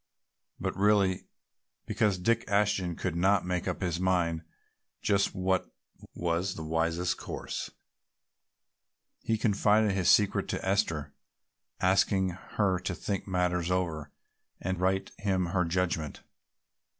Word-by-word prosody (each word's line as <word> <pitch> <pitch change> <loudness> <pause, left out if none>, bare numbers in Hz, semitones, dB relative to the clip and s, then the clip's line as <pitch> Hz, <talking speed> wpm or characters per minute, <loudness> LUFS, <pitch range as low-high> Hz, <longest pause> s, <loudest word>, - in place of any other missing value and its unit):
But - - -2
really, 100 -1 +2 0.6
because 105 -2 +1
Dick 115 +6 +1
Ashton 100 -4 +1
could 90 -1 -3
not 95 +2 +3
make 90 -1 -2
up 90 - -2
his 90 -2 -1
mind 85 -3 +1 0.6
just 100 -1 +1
what 95 0 0 0.4
was 85 +2 -1
the 80 - -6
wisest 85 +2 0
course, - - -5 1.5
he 110 - 0
confided 105 0 +3
his 95 -2 +1
secret 105 -2 +4
to - - -3
Esther, 80 -6 0 0.7
asking 95 0 +3
her 95 +1 -1
to 95 0 -3
think 100 +2 -3
matters 90 -2 0
over 85 -5 -1 0.5
and 95 0 -2
write 95 +1 0
him 95 -3 +1
her 90 -2 +3
judgment. 85 -3 -1
95 Hz, 120 wpm, -29 LUFS, 85-100 Hz, 1.5 s, secret